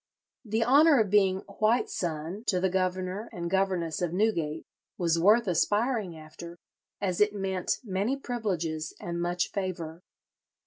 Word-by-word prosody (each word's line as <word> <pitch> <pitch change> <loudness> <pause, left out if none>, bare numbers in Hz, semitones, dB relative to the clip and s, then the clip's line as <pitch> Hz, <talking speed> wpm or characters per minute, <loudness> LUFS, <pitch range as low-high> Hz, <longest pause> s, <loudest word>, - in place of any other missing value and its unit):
'" - - -62
The 225 +1 +3
honour 285 +3 +6
of 210 -4 +1
being 190 -2 +3 0.2
"white 220 +3 +3
son" 170 +4 -4
to 185 - +2
the 190 0 +1
governor 185 +3 -1
and 170 -1 -5
governess 185 -5 0
of 175 -2 0
Newgate 170 -7 0 0.3
was 170 -2 +1
worth 215 +7 +5
aspiring 205 +1 +1
after, 170 +2 -10 0.4
as 185 -2 -1
it 210 0 +3
meant 190 -2 -1
many 210 +5 -1
privileges 180 - -3
and 170 0 -4
much 175 0 -1
favour. 175 -4 -4
185 Hz, 145 wpm, -28 LUFS, 170-210 Hz, 0.4 s, honour